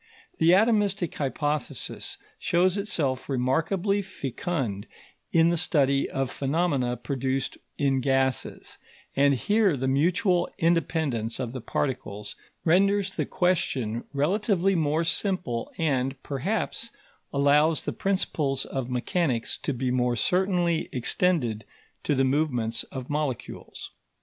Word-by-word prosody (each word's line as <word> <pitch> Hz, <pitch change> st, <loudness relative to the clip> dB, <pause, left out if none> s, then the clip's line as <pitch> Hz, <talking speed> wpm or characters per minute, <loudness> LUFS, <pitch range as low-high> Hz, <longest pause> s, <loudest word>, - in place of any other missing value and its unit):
The 160 Hz, -, +4 dB
atomistic 200 Hz, -4 st, +2 dB
hypothesis 145 Hz, 0 st, -2 dB, 0.2 s
shows 180 Hz, +2 st, +2 dB
itself 150 Hz, -12 st, -1 dB
remarkably 160 Hz, +10 st, +1 dB
fecund 135 Hz, -, -3 dB, 0.4 s
in 165 Hz, 0 st, +5 dB
the 170 Hz, -1 st, +2 dB
study 140 Hz, -3 st, +2 dB
of 135 Hz, -1 st, -2 dB
phenomena 140 Hz, -4 st, 0 dB
produced 135 Hz, +1 st, -2 dB, 0.2 s
in 135 Hz, -2 st, +2 dB
gases, 135 Hz, -1 st, -1 dB, 0.4 s
and 140 Hz, 0 st, +4 dB
here 205 Hz, -, +2 dB
the 130 Hz, +1 st, -1 dB
mutual 175 Hz, +6 st, +2 dB
independence 160 Hz, -9 st, 0 dB
of 125 Hz, -3 st, -3 dB
the 130 Hz, -1 st, -6 dB
particles 115 Hz, -4 st, -3 dB, 0.3 s
renders 195 Hz, +3 st, +3 dB
the -, -, -1 dB
question 130 Hz, -11 st, 0 dB
relatively 190 Hz, +6 st, +1 dB
more 160 Hz, -1 st, +1 dB
simple 165 Hz, -, 0 dB
and, 135 Hz, -4 st, 0 dB
perhaps, 200 Hz, -, -2 dB, 0.4 s
allows 145 Hz, +3 st, +3 dB
the -, -, -3 dB
principles 155 Hz, -8 st, 0 dB
of 130 Hz, -2 st, -4 dB
mechanics 125 Hz, 0 st, 0 dB
to -, -, -3 dB
be 125 Hz, -1 st, -1 dB
more 125 Hz, -1 st, +1 dB
certainly 180 Hz, +1 st, +1 dB
extended 125 Hz, -4 st, +1 dB, 0.4 s
to 145 Hz, -, +2 dB
the 135 Hz, -, +3 dB
movements 125 Hz, -5 st, 0 dB
of 130 Hz, -2 st, -7 dB
molecules. 145 Hz, -4 st, -4 dB
145 Hz, 115 wpm, -26 LUFS, 130-180 Hz, 0.4 s, in